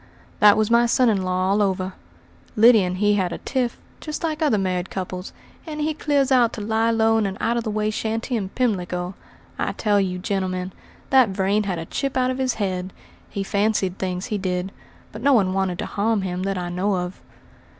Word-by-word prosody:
"That 210 Hz, 0 st, +7 dB
was 215 Hz, +1 st, +1 dB
my 235 Hz, 0 st, +5 dB
son 245 Hz, +1 st, +3 dB
in 200 Hz, -3 st, +1 dB
law 185 Hz, +1 st, 0 dB
all 205 Hz, +1 st, +2 dB
over. 190 Hz, -1 st, 0 dB, 0.6 s
Lyddy 225 Hz, -1 st, +7 dB
and 180 Hz, 0 st, -2 dB
he 205 Hz, +1 st, +3 dB
had 185 Hz, -3 st, 0 dB
a -, -, -4 dB
tiff, 250 Hz, -3 st, -2 dB, 0.2 s
just 305 Hz, +2 st, -6 dB
like 315 Hz, -1 st, -2 dB
other 290 Hz, -9 st, +3 dB
married 185 Hz, -2 st, -1 dB
couples, 185 Hz, 0 st, -5 dB, 0.4 s
and 305 Hz, -1 st, -5 dB
he 310 Hz, +1 st, 0 dB
clears 285 Hz, -3 st, +1 dB
out 245 Hz, -3 st, +4 dB
to 215 Hz, -, -5 dB
lie 220 Hz, +2 st, +1 dB
low 225 Hz, 0 st, +3 dB
in 210 Hz, -, +1 dB
an 190 Hz, 0 st, -5 dB
out 235 Hz, -, 0 dB
of 235 Hz, -, -1 dB
the 220 Hz, -, -3 dB
way 215 Hz, 0 st, 0 dB
shanty 225 Hz, +3 st, -2 dB
in 200 Hz, -4 st, -2 dB
Pimlico. 180 Hz, -6 st, -1 dB, 0.5 s
I -, -, -1 dB
tell 205 Hz, -2 st, +2 dB
you, 185 Hz, -2 st, -2 dB
gentlemen, 185 Hz, -1 st, -2 dB, 0.4 s
that 260 Hz, -4 st, +6 dB
Vrain 195 Hz, +2 st, +1 dB
had 190 Hz, -3 st, -2 dB
a 165 Hz, -, -5 dB
chip 275 Hz, -, -3 dB
out 255 Hz, 0 st, +2 dB
of 255 Hz, -, -4 dB
his 260 Hz, -1 st, 0 dB
head. 185 Hz, -3 st, -3 dB, 0.4 s
He 200 Hz, -, -3 dB
fancied 200 Hz, -2 st, 0 dB
things, 185 Hz, 0 st, -2 dB
he 215 Hz, -4 st, -2 dB
did; 185 Hz, 0 st, -2 dB, 0.4 s
but 215 Hz, -, -9 dB
no 280 Hz, +2 st, +4 dB
one 195 Hz, -6 st, +3 dB
wanted 190 Hz, -2 st, 0 dB
to -, -, -3 dB
harm 210 Hz, 0 st, 0 dB
him 180 Hz, -1 st, -3 dB
that 195 Hz, -, -2 dB
I 175 Hz, -1 st, -3 dB
know 190 Hz, +3 st, 0 dB
of." 180 Hz, 0 st, -4 dB
205 Hz, 215 wpm, -23 LUFS, 185-230 Hz, 0.6 s, That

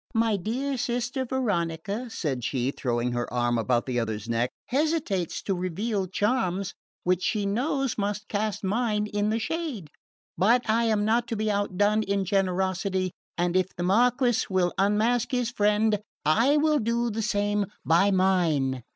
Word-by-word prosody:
"My 225 Hz, -1 st, +3 dB
dear 255 Hz, +8 st, -2 dB
Sister 245 Hz, +2 st, -2 dB
Veronica," 205 Hz, -3 st, -2 dB
said 140 Hz, -, -3 dB
she, 130 Hz, +1 st, -1 dB
throwing 120 Hz, -2 st, -1 dB
her 120 Hz, 0 st, -3 dB
arm 120 Hz, -1 st, +1 dB
about 120 Hz, +1 st, +1 dB
the 125 Hz, -2 st, -1 dB
other's 110 Hz, -2 st, -3 dB
neck, 115 Hz, +1 st, 0 dB, 0.2 s
"hesitates 275 Hz, -, 0 dB
to 195 Hz, -, 0 dB
reveal 190 Hz, +3 st, -2 dB
charms 195 Hz, -2 st, 0 dB, 0.3 s
which 180 Hz, 0 st, +1 dB
she 210 Hz, 0 st, 0 dB
knows 265 Hz, +4 st, -1 dB
must 205 Hz, 0 st, -2 dB
cast 210 Hz, 0 st, -2 dB
mine 210 Hz, +1 st, 0 dB
in 205 Hz, 0 st, -1 dB
the 220 Hz, -, +1 dB
shade; 255 Hz, -, -3 dB, 0.5 s
but 235 Hz, +6 st, +3 dB
I 230 Hz, +2 st, +2 dB
am 215 Hz, -2 st, +1 dB
not 230 Hz, +3 st, +2 dB
to 235 Hz, -, -2 dB
be 215 Hz, 0 st, 0 dB
outdone 205 Hz, +1 st, +1 dB
in 200 Hz, -2 st, -1 dB
generosity, 190 Hz, 0 st, 0 dB, 0.3 s
and 175 Hz, 0 st, 0 dB
if 185 Hz, -1 st, +3 dB
the 175 Hz, -, -2 dB
Marquess 240 Hz, +4 st, +2 dB
will 185 Hz, -2 st, +1 dB
unmask 215 Hz, +5 st, +2 dB
his 245 Hz, -2 st, 0 dB
friend 210 Hz, -1 st, +2 dB, 0.3 s
I 235 Hz, -, +4 dB
will 305 Hz, 0 st, +3 dB
do 235 Hz, +1 st, 0 dB
the 220 Hz, +2 st, -2 dB
same 205 Hz, -2 st, 0 dB, 0.2 s
by 175 Hz, +5 st, +4 dB
mine." 170 Hz, -9 st, +2 dB
205 Hz, 160 wpm, -26 LUFS, 180-230 Hz, 0.5 s, I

